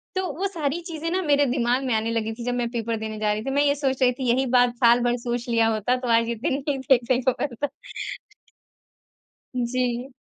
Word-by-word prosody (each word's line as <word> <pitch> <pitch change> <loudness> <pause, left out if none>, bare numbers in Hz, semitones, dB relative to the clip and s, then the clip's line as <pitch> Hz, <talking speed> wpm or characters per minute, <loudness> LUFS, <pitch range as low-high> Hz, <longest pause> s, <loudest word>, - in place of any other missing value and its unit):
तो 375 0 0
वो 395 +2 0
सारी 325 -2 -2
चीजें 330 0 -4
ना 375 +1 0
मेरे 290 -3 +3
दिमाग 245 0 +1
में 250 - 0
आने 225 +1 0
लगी 225 -1 -1
थी 235 +1 -8
जब 245 - 0
मैं 240 -1 -1
पेपर 230 -1 -2
देने 215 0 -5
जा 210 -1 +1
रही 215 +1 -4
थी। - - -2
मैं 285 +1 +2
ये 285 0 +3
सोच 270 -2 -1
रही 250 -1 +5
थी 250 -1 -3
यही 260 +3 +2
बात 245 0 +3
साल 235 0 +5
भर 245 0 +1
सोच 240 0 -3
लिया 230 -1 +3
होता 230 +4 +1
तो 250 -1 -5
आज 230 0 +1
ये 235 - -1
दिन 265 +6 -1
नहीं 275 -2 0
देखने 250 0 +3
को 260 +1 +3
मिलता। 285 +1 -2 1.9
जी। 245 +1 -1
245 Hz, 230 wpm, -24 LUFS, 235-275 Hz, 1.9 s, रही